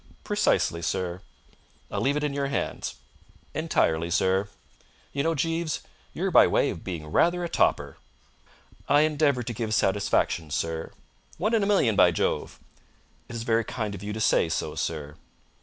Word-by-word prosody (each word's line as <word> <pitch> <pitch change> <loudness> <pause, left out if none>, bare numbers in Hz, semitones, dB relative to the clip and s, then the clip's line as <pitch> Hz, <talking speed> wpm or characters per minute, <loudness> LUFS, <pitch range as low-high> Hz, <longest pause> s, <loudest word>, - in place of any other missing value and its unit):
"Precisely, 85 - +1
sir." 90 +1 -2 0.7
"I'll - - -2
leave 140 +2 +1
it 150 - -2
in 150 -1 -1
your 140 0 -1
hands." 140 - -3 0.6
"Entirely, 80 +1 +1
sir." 95 +2 +1 0.6
"You 140 - 0
know, 165 +3 +1
Jeeves, 165 +2 -1 0.3
you're - - -2
by - - +7
way - - +2
of 80 - -8
being 85 -5 -5
rather 175 - +2
a - - -1
topper." - - +1 0.9
"I 145 +1 +6
endeavour 150 -4 +2
to 120 - -4
give 110 -1 -2
satisfaction, 95 -5 +1
sir." 80 +2 -3 0.5
"One 215 +7 0
in 225 - +3
a 200 - +1
million, 165 - +3
by 90 - +6
Jove!" 85 - -2 0.7
"It 120 - -7
is 115 - -4
very 115 -1 +2
kind 110 -2 -4
of 100 - -8
you 105 +1 -5
to 110 - -4
say 105 -5 +3
so, - - -2
sir." 75 -2 -4
110 Hz, 165 wpm, -26 LUFS, 85-145 Hz, 0.9 s, by